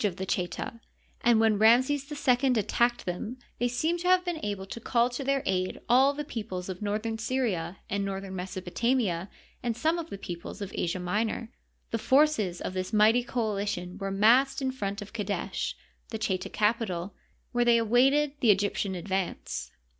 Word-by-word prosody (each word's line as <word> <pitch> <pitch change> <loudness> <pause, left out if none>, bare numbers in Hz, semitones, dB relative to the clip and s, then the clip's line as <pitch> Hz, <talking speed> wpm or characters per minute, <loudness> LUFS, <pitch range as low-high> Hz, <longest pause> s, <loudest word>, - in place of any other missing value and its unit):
of 200 -4 +1
the 190 - -4
Cheta, 185 +4 -3 0.4
and 235 -2 +5
when 220 -2 +3
Ramses 260 +6 +4
II 260 -2 +2
attacked 240 +3 +1
them 200 +7 -4 0.2
they 245 - +2
seem 315 +8 0
to 360 - -2
have 365 0 +4
been 345 -3 -3
able 200 -2 -3
to 195 - -7
call 235 +1 +1
to 245 +3 -4
their 275 0 +1
aid 185 -1 -1
all 260 +3 +5
the 295 - -3
peoples 195 -8 -5
of 185 +1 -6
northern 215 +2 -2
Syria 220 -8 -1
and 200 0 -1
northern 195 -1 -4
Mesopotamia 185 +1 -1 0.3
and 235 -2 -2
some 320 +6 +1
of 335 -1 -6
the - - -6
peoples 175 +1 -7
of 200 -2 -5
Asia 175 +1 -1
Minor, 215 +5 -2 0.4
The 230 - 0
forces 230 - +3
of - - -4
this 185 0 -3
mighty 220 +3 +5
coalition 205 -6 -2
were 195 -1 -2
massed 230 +8 +4
in 265 -1 -1
front 205 -4 -4
of 205 - -14
Qadesh, 205 -3 -2 0.3
the 220 - -4
Cheta 190 -4 -2
capital, 210 -4 0 0.4
where 240 0 +2
they 235 -1 +6
awaited 265 +6 +3
the 235 - +3
Egyptian 200 -1 +2
advance. 190 +1 -3
220 Hz, 175 wpm, -28 LUFS, 190-245 Hz, 0.4 s, they